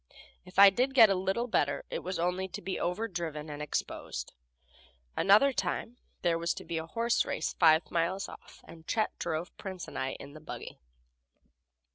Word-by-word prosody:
If 180 +1 -15
I 200 0 +10
did 255 +6 0
get 225 -5 +8
a - - +5
little 190 +5 0
better, 145 -12 0
it - - -2
was 185 +1 -4
only 180 +2 0
to - - -7
be 190 +1 -3
overdriven 175 -6 -3
and 145 0 -6
exposed. 145 - -4 0.8
Another 215 +8 +5
time 215 +4 -2 0.3
there 170 -2 +2
was 170 +1 0
to - - -8
be 165 - -2
a 160 - -6
horse 230 +6 +1
race - - -2
five 160 -1 +5
miles 175 +4 0
off, - - -13
and 165 -1 -13
Chet 215 -1 0
drove 165 +1 -3
Prince 190 -3 -6
and - - -6
I 130 0 -1
in 140 - -10
the 155 - -11
buggy. 155 - -8
180 Hz, 180 wpm, -30 LUFS, 165-200 Hz, 0.8 s, I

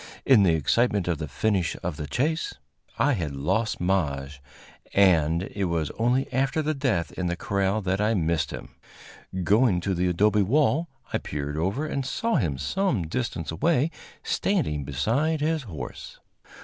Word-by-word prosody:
In 130 -6 +6
the 90 -4 +4
excitement 100 - +1
of 85 -4 0
the 80 - -3
finish 95 +4 0
of 90 -3 -2
the 75 0 -5
chase 150 - -1 0.4
I 145 - +3
had 80 - -3
lost 110 +12 0
Maje, 75 -7 -1 0.6
and 85 -4 +4
it 100 -1 -1
was 85 -4 -1
only 125 +4 +1
after 135 +5 +1
the 155 +1 0
death 130 - 0
in 90 - -3
the 85 - -1
corral 100 +3 0
that 95 +2 0
I 110 +2 +2
missed 80 -3 0
him. - - -7 0.7
Going 105 +1 +3
to 95 +2 -1
the 90 +1 +1
adobe 105 +4 +3
wall, 150 - +2 0.2
I - - +1
peered 75 0 -4
over 95 - -1
and 140 -3 -2
saw 230 - 0
him 80 - 0
some 165 - 0
distance 85 - -3
away 155 - +1 0.3
standing 125 - 0
beside 135 - 0
his 155 +1 0
horse. 80 -5 -8
100 Hz, 160 wpm, -26 LUFS, 80-130 Hz, 0.7 s, In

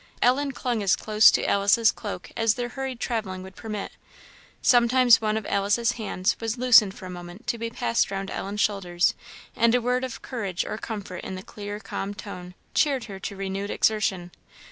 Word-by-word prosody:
Ellen 275 +3 +2
clung 245 -4 -2
as 195 -2 +3
close 215 0 +5
to - - +1
Alice's 205 +3 +4
cloak 205 -5 -7
as 225 -1 +2
their 245 0 -3
hurried 265 -1 -5
travelling 195 -7 -3
would 190 0 -11
permit; 215 -3 -5 0.7
sometimes 245 -1 +5
one 215 0 0
of 220 - -4
Alice's 205 +4 +1
hands 210 -5 -1
was 225 +1 -3
loosened 225 -6 +6
for - - -10
a - - -7
moment 175 +3 -10
to 235 - -2
be 230 0 -3
passed 115 - 0
round 195 0 -4
Ellen's 205 +2 -3
shoulders, 180 -4 +1 0.4
and 235 +1 +4
a - - +4
word 250 +2 0
of 255 -2 -6
courage 200 -8 -3
or 215 - -5
comfort 200 -6 -6
in 190 - -5
the 185 - -7
clear 205 -1 -7
calm 200 0 -5
tone, 180 -4 -9 0.2
cheered 275 -5 +2
her 195 -4 -8
to 200 - -5
renewed 195 +1 -4
exertion. 195 -6 0
210 Hz, 190 wpm, -25 LUFS, 195-235 Hz, 0.7 s, loosened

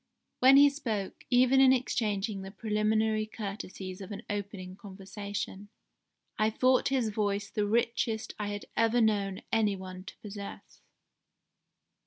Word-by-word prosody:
When 265 +2 +8
he 285 0 +8
spoke, 220 -9 -4
even 255 +2 +5
in 265 -1 +7
exchanging 215 -5 0
the 190 - -7
preliminary 215 +1 0
courtesies 195 -3 -6
of 195 +2 -8
an 200 - -6
opening 200 -2 -5
conversation, 200 0 -6 0.7
I 215 0 +4
thought 255 +3 +3
his 260 -5 +1
voice 205 -1 -1
the 210 -1 0
richest 225 0 0
I 210 - -2
had 205 0 -5
ever 230 +1 +3
known 200 -4 +1
any 215 -3 +3
one 185 -1 -8
to - - -10
possess. 200 -1 -9
210 Hz, 135 wpm, -30 LUFS, 200-225 Hz, 0.7 s, When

